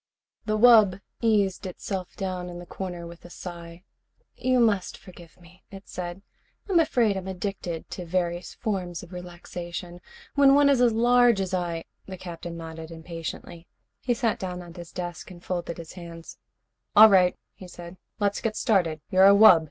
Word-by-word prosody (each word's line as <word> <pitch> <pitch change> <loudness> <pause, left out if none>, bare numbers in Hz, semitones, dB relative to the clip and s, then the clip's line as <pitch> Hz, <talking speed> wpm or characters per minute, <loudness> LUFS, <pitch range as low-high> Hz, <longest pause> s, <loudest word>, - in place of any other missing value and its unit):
The 215 0 +1
wub 215 -5 +6 0.2
eased 205 -5 +1
itself 185 0 -5
down 185 -2 -4
in 175 - -8
the 175 - -9
corner 175 -1 -6
with 170 0 -12
a 175 - -12
sigh. 170 -1 -9 0.5
"You 255 0 +1
must 210 -5 +1
forgive 175 -2 -15
me," 180 +2 -19
it 195 0 -12
said. 180 +2 -6 0.4
"I'm 375 -4 +3
afraid 240 -10 +2
I'm 190 -1 -5
addicted 185 -3 -5
to 180 - -6
various 175 0 -2
forms 185 -6 -3
of 180 +1 -13
relaxation. 175 0 -8 0.3
When 280 -1 +6
one 285 0 +5
is 265 -3 +3
as 245 -1 +5
large 240 -1 +4
as 190 -1 -2
I 170 -2 -2
" - - -48
The 190 -1 -7
Captain 170 -1 -7
nodded 160 -1 -8
impatiently. 165 0 -8 0.3
He 245 -1 0
sat 230 -2 0
down 180 -1 -5
at 170 -1 -13
his 175 -2 -10
desk 175 -1 -6
and 175 -1 -13
folded 175 -2 -3
his 165 -2 -9
hands. 170 -2 -10 0.6
"All 215 +1 +10
right," 180 -2 +4 0.2
he 185 - -12
said. 175 0 -11 0.2
"Let's 205 -1 0
get 220 -1 -2
started. 170 -8 +1
You're 190 +1 +7
a 200 - +8
wub? 200 -5 +8
180 Hz, 175 wpm, -26 LUFS, 175-205 Hz, 0.6 s, All